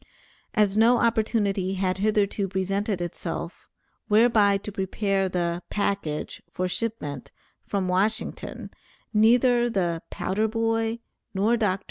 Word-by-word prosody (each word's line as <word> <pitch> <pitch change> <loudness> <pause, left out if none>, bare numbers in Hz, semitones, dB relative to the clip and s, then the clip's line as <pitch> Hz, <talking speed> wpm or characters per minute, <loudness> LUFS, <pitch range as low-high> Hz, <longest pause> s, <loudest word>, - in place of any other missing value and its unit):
As 210 -2 +3
no 230 +3 +5
opportunity 210 -5 +1
had 185 0 -1
hitherto 205 -1 +1
presented 195 +1 -1
itself, 175 -1 -5 0.4
whereby 215 -2 +4
to 205 +1 -7
prepare 195 0 -1
the 175 -1 -1
"package" 200 -7 -2
for 185 - -2
shipment, 180 - -4 0.4
from 195 -2 -1
Washington, 200 +4 0 0.4
neither 240 +2 +4
the 175 -6 -1
"powder 210 +4 -1
boy" 225 0 0 0.4
nor 210 +5 +3
Dr. 210 -5 +1
T. - - -25
200 Hz, 115 wpm, -25 LUFS, 190-225 Hz, 0.4 s, no